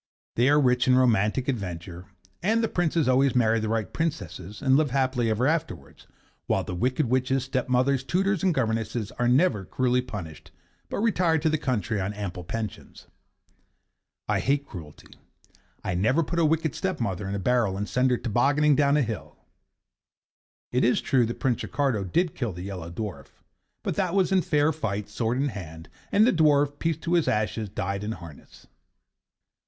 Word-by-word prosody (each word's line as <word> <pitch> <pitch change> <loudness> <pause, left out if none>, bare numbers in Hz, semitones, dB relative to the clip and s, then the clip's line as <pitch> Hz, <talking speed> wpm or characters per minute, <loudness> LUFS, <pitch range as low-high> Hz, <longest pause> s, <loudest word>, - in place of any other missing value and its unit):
They 120 +3 +3
are 145 +1 +5
rich 125 -1 +2
in 130 - +5
romantic 120 0 +2
adventure, 90 -7 -4 0.4
and 225 +5 +2
the - - +2
Princes 170 - 0
always 130 +1 +3
marry 115 -2 +3
the 110 0 -2
right 110 -1 -2
Princesses 100 - -4
and 135 -1 +3
live 150 0 +3
happy 130 -3 +1
ever 110 +3 +1
afterwards; 155 - -3 0.4
while - - +1
the - - -6
wicked 130 - 0
witches, 130 +1 +1
stepmothers, 130 0 +1
tutors 190 +4 0
and 190 - +3
governesses 115 -5 -1
are 120 - +2
never 125 - +3
cruelly 125 +5 +1
punished, 95 -11 -8 0.4
but - - -3
retire 180 -7 +2
to 160 +1 +1
the 155 - +1
country 110 - -1
on 95 +2 -2
ample 100 -3 -5
pensions. 110 +3 -6 1.2
I - - +1
hate 140 +1 0
cruelty: 80 - -11 0.7
I - - -2
never 115 - +2
put 170 +3 -2
a 165 - +4
wicked 160 -2 +1
stepmother 105 - -2
in 100 - -2
a - - -1
barrel 110 -1 +1
and 105 +1 -3
send 125 +8 +2
her 125 - +2
tobogganing 140 +7 +2
down 145 0 +3
a 150 - +3
hill. 115 -4 -6 1.3
It 125 +1 +1
is 125 - +3
true 125 -4 +2
that 120 - -5
Prince 125 -5 0
Ricardo 135 -8 -1
did 170 - 0
kill 120 -7 -3
the 90 +1 -7
Yellow 95 -4 -6
Dwarf; 105 +3 -6 0.6
but - - -1
that 185 -2 0
was 190 -1 +2
in 190 -1 +4
fair 150 -1 +2
fight, 105 -9 -3
sword 115 +3 -1
in 140 +2 +1
hand, 80 -6 -9 0.2
and 210 +2 +5
the 245 - +3
dwarf, 145 -3 +3
peace 165 -2 0
to 165 +2 -3
his 170 -3 +3
ashes! 105 0 -1
died 100 +1 -3
in 110 +1 -3
harness. 85 -8 -13
125 Hz, 180 wpm, -26 LUFS, 105-150 Hz, 1.3 s, are